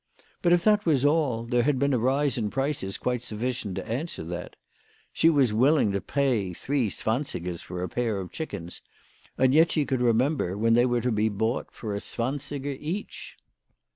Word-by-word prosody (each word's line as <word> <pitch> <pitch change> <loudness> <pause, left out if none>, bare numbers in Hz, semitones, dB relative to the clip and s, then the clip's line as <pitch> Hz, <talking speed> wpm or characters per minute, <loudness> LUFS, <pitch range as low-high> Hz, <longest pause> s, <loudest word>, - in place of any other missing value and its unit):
But, 175 - +3
if 175 -1 +4
that 210 -1 +4
was 145 -6 +2
all, 145 -7 +2
there 120 0 +2
had 140 +2 +1
been 140 +1 +1
a 125 - +2
rise 135 +3 +1
in 110 -4 -1
prices 135 -7 -2
quite 125 -1 -1
sufficient 115 -3 -3
to - - -5
answer 130 - -3
that. 85 +2 -6 0.6
She 165 - +4
was 135 -8 +3
willing 130 0 +4
to 100 0 -1
pay 125 -10 0
three 130 +3 -1
zwansigers 95 - -3
a 90 0 -3
pair 110 -5 -1
for - - -15
chickens, 100 - -6 0.6
and 130 0 +3
yet 160 +2 +5
she 150 -3 +1
could 130 -3 -1
remember 120 - +1
when 115 +2 +3
they 120 +2 +4
were 120 -1 +1
to 125 - 0
be 110 0 +2
bought 110 +4 -1
for 105 -3 -5
a - - -2
zwansiger 140 +4 -4
each. 180 +8 -5
125 Hz, 185 wpm, -26 LUFS, 110-145 Hz, 0.6 s, yet